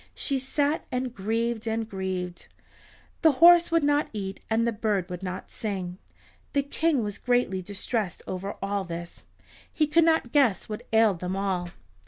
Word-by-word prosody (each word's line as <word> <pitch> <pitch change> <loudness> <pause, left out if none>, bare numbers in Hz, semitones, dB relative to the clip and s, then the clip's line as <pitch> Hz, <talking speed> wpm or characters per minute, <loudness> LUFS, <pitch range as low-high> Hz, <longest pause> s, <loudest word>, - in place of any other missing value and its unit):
She 275 -2 0
sat 285 +3 0
and 250 -1 -2
grieved 225 +3 -2
and 225 0 -1
grieved. 185 -3 -4 0.7
The 320 -3 +6
horse 345 +4 +7
would 330 -2 +2
not 290 +1 +2
eat 195 -2 -5
and 225 +1 +2
the 235 - +1
bird 210 -4 -1
would 180 0 -5
not 185 -1 -6
sing. 190 -4 -4 0.5
The 280 -1 +2
King 285 -2 +1
was 205 -1 -4
greatly 245 -7 +1
distressed 205 0 -3
over 190 +2 -4
all 200 0 -1
this. 170 -1 -8 0.5
He 310 - +2
could 325 +3 +4
not 320 -7 +2
guess 260 -9 +3
what 210 -1 -7
ailed 220 -5 +4
them 180 +1 -3
all. 190 -3 -1
220 Hz, 165 wpm, -27 LUFS, 190-270 Hz, 0.7 s, horse